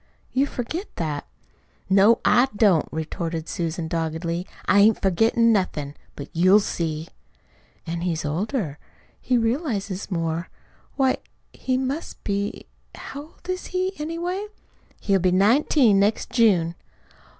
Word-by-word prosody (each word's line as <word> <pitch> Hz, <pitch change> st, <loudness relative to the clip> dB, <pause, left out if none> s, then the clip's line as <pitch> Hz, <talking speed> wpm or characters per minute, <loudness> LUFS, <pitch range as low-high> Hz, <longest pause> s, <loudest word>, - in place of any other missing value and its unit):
You 270 Hz, +2 st, +2 dB
forget 315 Hz, -, -4 dB
that." 150 Hz, -3 st, -3 dB, 0.6 s
"No, 200 Hz, +4 st, +5 dB
I 250 Hz, +2 st, +5 dB
don't," 200 Hz, -7 st, +4 dB
retorted 160 Hz, 0 st, -4 dB
Susan 165 Hz, -1 st, -3 dB
doggedly. 165 Hz, +2 st, -2 dB, 0.2 s
"I 200 Hz, -, +4 dB
ain't 215 Hz, +2 st, +5 dB
forgettin' 225 Hz, +5 st, +3 dB
nothin'. 155 Hz, -8 st, -1 dB, 0.2 s
'But 140 Hz, -, -8 dB
you'll 185 Hz, +5 st, +6 dB
see!" 160 Hz, -5 st, -3 dB, 0.8 s
"An' 170 Hz, 0 st, -4 dB
he's 170 Hz, -3 st, -2 dB
older. 165 Hz, -, -2 dB, 0.4 s
He 250 Hz, -1 st, +2 dB
realizes 225 Hz, -, -1 dB
more. 165 Hz, -2 st, -2 dB, 0.5 s
Why, 265 Hz, -2 st, +2 dB, 0.4 s
he 255 Hz, -1 st, -1 dB
must 265 Hz, +5 st, -4 dB
be 200 Hz, 0 st, -2 dB, 0.3 s
How 280 Hz, -, -7 dB
old 320 Hz, +3 st, -17 dB
is 370 Hz, 0 st, -3 dB
he, 370 Hz, +1 st, -1 dB
anyway?" 345 Hz, +6 st, -3 dB, 0.5 s
"He'll 195 Hz, -2 st, +2 dB
be 185 Hz, 0 st, +2 dB
nineteen 220 Hz, -, +4 dB
next 205 Hz, +2 st, +1 dB
June." 190 Hz, -9 st, +3 dB
200 Hz, 125 wpm, -24 LUFS, 170-255 Hz, 0.8 s, you'll